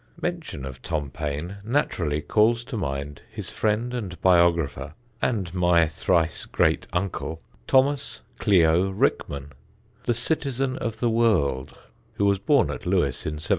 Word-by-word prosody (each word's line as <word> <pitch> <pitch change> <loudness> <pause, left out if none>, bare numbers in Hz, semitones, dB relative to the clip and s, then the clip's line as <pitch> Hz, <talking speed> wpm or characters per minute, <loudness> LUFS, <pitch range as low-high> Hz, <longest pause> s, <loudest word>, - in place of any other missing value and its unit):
[Sidenote: - - -34
"CLIO" - - -1
RICKMAN] - - -9
Mention 70 - -8
of 65 -1 -8
Tom 75 -4 -2
Paine 75 +6 -4
naturally 90 - 0
calls 115 +2 +3
to 120 - -7
mind 70 -6 -4
his - - -7
friend 110 +3 0
and 100 -8 -5
biographer 85 -5 +2 0.3
(and 100 -9 -1
my 90 -2 +4
thrice 80 +1 0
great - - +1
uncle), 90 -3 -2 0.3
Thomas 135 +1 +2 0.2
"Clio" 90 -1 +4
Rickman, 70 -7 -1 0.5
the 120 - +1
Citizen 135 -1 -1
of 115 -1 -4
the 120 - +3
World, 80 - +1 0.4
who 100 - 0
was 100 -1 +3
born 140 +7 +3
at - - -7
Lewes 85 -9 0
in 75 - -2
1760. 75 - -8
90 Hz, 155 wpm, -25 LUFS, 75-115 Hz, 0.5 s, my